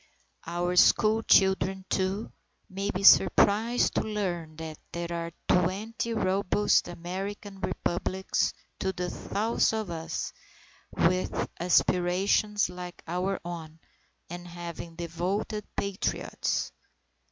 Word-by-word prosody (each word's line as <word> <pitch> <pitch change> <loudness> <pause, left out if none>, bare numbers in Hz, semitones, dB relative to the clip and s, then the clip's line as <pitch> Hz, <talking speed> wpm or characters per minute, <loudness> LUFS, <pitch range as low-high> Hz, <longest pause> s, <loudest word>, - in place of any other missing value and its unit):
Our 175 +1 -1
school 215 +4 +5
children, 190 -2 +3
too, 190 +3 -1 0.4
may 195 +2 -3
be 195 -1 -2
surprised 220 +4 +5
to - - +1
learn, 180 -7 -3
that 160 -1 -7
there 170 0 -4
are 170 0 -3 0.2
20 215 +6 0
robust 200 0 +2
American 195 +3 -6
Republics 190 +1 -1 0.3
to 190 - 0
the 180 -1 -3
south 220 +3 0
of 215 -5 -2
us, 165 -1 -4 0.6
with 185 +2 +1
aspirations 180 +4 +2
like 180 0 -8
our 180 +3 -1
own, 165 -2 -7 0.5
and 175 +1 -8
having 170 -1 -7
devoted 180 +6 -3
Patriots. 200 -1 -2
185 Hz, 105 wpm, -28 LUFS, 175-200 Hz, 0.6 s, school